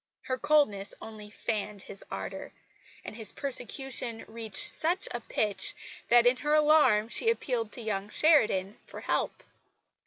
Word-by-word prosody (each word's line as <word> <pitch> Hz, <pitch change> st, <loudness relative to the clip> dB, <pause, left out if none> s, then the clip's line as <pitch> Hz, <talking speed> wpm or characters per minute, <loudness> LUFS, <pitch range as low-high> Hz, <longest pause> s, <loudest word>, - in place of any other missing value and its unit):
Her 255 Hz, -1 st, -2 dB
coldness 285 Hz, -10 st, +2 dB
only 215 Hz, -2 st, -10 dB
fanned 210 Hz, -2 st, -4 dB
his 195 Hz, -, -7 dB
ardour; -, -, -6 dB, 0.5 s
and -, -, -7 dB
his 220 Hz, -3 st, -2 dB
persecution 255 Hz, -3 st, 0 dB
reached 220 Hz, -3 st, -2 dB
such 350 Hz, +4 st, +1 dB
a 240 Hz, -, -3 dB
pitch 210 Hz, -2 st, -1 dB, 0.3 s
that 240 Hz, 0 st, +6 dB
in 245 Hz, +1 st, +4 dB
her 295 Hz, +3 st, +1 dB
alarm 300 Hz, -8 st, +5 dB
she 450 Hz, -, 0 dB
appealed 245 Hz, -, -1 dB
to -, -, -7 dB
young 205 Hz, -2 st, -3 dB
Sheridan 215 Hz, -, +3 dB
for -, -, -9 dB
help. -, -, -1 dB
230 Hz, 145 wpm, -29 LUFS, 210-285 Hz, 0.5 s, that